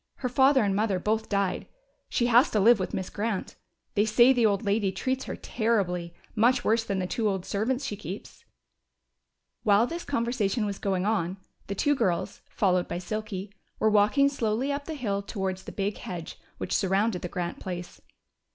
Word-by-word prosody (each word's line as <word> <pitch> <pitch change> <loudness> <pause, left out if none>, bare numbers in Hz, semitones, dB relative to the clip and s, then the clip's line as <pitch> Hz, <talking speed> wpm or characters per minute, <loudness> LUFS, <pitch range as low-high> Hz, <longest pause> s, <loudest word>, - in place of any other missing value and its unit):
Her 250 - -3
father 265 0 +4
and 200 -2 +1
mother 205 -2 +1
both 220 +4 -1
died, 200 -2 0
so - - -42
she 240 - +1
has 240 +3 +5
to 215 - +1
live 225 +2 +6
with 185 - -2
Miss 185 - -4
Grant. 210 -1 -3 0.4
They 205 - +3
say 240 +4 +5
the 240 -3 +4
old 205 +2 0
lady 200 -1 +1
treats 260 +7 -2
her - - -4
terribly 180 -7 -1 0.2
much 245 +3 +3
worse 225 +1 +3
than 200 -3 -2
the 185 - -1
two 215 +3 0
old 190 -2 -2
servants 250 +7 -1
she 210 - -3
keeps." 195 0 -8 1.2
While 210 +1 +4
this 335 +6 -5
conversation 235 -4 0
was 200 -1 -4
going 190 -2 0
on, 190 -4 0 0.3
the 200 - -3
two 290 +9 +2
girls, 190 -11 -1
followed 185 -3 +1
by - - -3
Silky, 200 +1 -5 0.2
were 220 - +2
walking 210 +7 +4
slowly 255 -1 0
up 285 0 -4
the 320 - -5
hill 205 -8 -1
towards 190 -2 -4
the - - -7
big 200 +1 -2
hedge 170 -3 -7 0.2
which - - -2
surrounded 195 0 +1
the 180 - -4
Grant 175 -1 -4
place. 175 -1 -6
210 Hz, 190 wpm, -27 LUFS, 190-235 Hz, 1.2 s, live